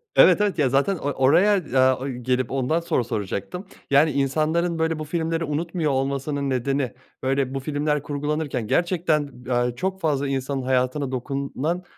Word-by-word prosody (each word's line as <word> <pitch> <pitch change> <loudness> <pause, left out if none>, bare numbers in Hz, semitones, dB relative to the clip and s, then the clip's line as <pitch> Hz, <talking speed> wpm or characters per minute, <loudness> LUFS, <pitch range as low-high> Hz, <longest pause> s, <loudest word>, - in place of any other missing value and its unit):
Evet, 185 +2 +7
evet. 200 -5 0
Ya, 135 - +3
zaten 140 +9 +2
or 145 -2 -2
oraya, 180 +10 +5
eee, 130 -5 +1
gelip 125 0 -1
ondan 135 +5 +1
soru 165 -7 0
soracaktım. 110 - -4 0.3
Yani, 145 +3 +5
insanların, 155 +5 0
böyle, 160 -1 0
bu - - -3
filmleri 165 +1 -1
unutmuyor 160 +1 -1
olmasının 140 +1 -1
nedeni, 130 0 -1 0.3
böyle, 135 0 0
bu 135 - -2
filmler 150 +1 -1
kurgulanırken 145 -4 -2
gerçekten, 165 - +1 0.2
eee, 120 -1 0
çok 190 +7 -3
fazla 145 -3 0
insanın 135 0 -2
hayatına 130 +2 0
dokunan, 140 +6 -3
140 Hz, 150 wpm, -23 LUFS, 130-160 Hz, 0.3 s, Evet